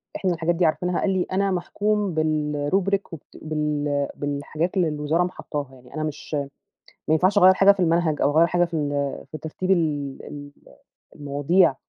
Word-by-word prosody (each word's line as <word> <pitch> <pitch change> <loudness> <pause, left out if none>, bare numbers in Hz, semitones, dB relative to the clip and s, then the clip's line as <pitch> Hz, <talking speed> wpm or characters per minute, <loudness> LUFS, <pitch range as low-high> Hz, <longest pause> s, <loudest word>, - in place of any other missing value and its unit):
إحنا 185 -3 0
الحاجات 165 +1 0
دي 175 +1 +2
عارفينها، 180 +3 0
قال - - 0
لي 185 -2 +1
أنا 195 +1 +1
محكوم 205 +1 -1
بالrubric 155 +6 0
وبت 160 - -11
بال 150 -2 -1
بالحاجات 145 +6 -3
اللي 180 -3 +3
الوزارة 150 +3 0
م 180 - -1
حطاها 145 -6 -5
يعني 125 -1 -17
أنا 155 - -2
مش 155 0 -6 0.8
ما 155 - +4
ينفعش 185 +6 +3
أغير 185 -1 +7
حاجة 195 +1 +6
في 200 - -5
المنهج 165 -3 +1
أو - - +4
أغير 165 +1 +6
حاجة 175 0 +2
في 170 -1 -7
ال 150 -3 -1 0.4
في 155 +3 -8
ترتيب 160 +5 -4
ال 150 -6 0
ال 145 -1 -9 0.7
المواضيع. 145 +3 +2
160 Hz, 175 wpm, -24 LUFS, 150-180 Hz, 0.8 s, أغير